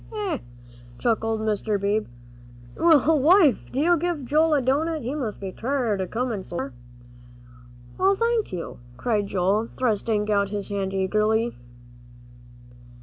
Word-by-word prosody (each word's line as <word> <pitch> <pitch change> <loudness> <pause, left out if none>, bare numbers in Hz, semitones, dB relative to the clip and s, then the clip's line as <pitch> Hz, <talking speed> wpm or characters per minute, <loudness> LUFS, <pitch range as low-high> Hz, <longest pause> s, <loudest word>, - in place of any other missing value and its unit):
"Hee, 440 - -7
hee, 310 - 0
hee!" - - -16 0.5
chuckled 225 -1 0
Mr. 215 -1 -1
Beebe; 205 +2 0 0.7
"well, 320 -2 +4
wife, 315 0 +5
do 330 +7 +3
give 340 -5 -2
Joel 310 +4 +3
a 285 - +2
doughnut; 305 +4 0
he 250 +4 -3
must 250 -9 -4
be 195 -1 -5
tired, 235 -4 -1
a 185 - -2
comin' 230 -3 -2
so 175 - -7
far." 135 -3 -4 1.3
"Oh, 390 +1 +4
thank 465 +1 0
you," 175 -8 -6 0.2
cried 215 -4 0
Joel, 200 +4 0
thrusting 215 -3 0
out 200 -1 +2
his 205 0 -4
hand 195 -1 -2
eagerly. 215 +4 +1
230 Hz, 145 wpm, -24 LUFS, 205-300 Hz, 1.3 s, wife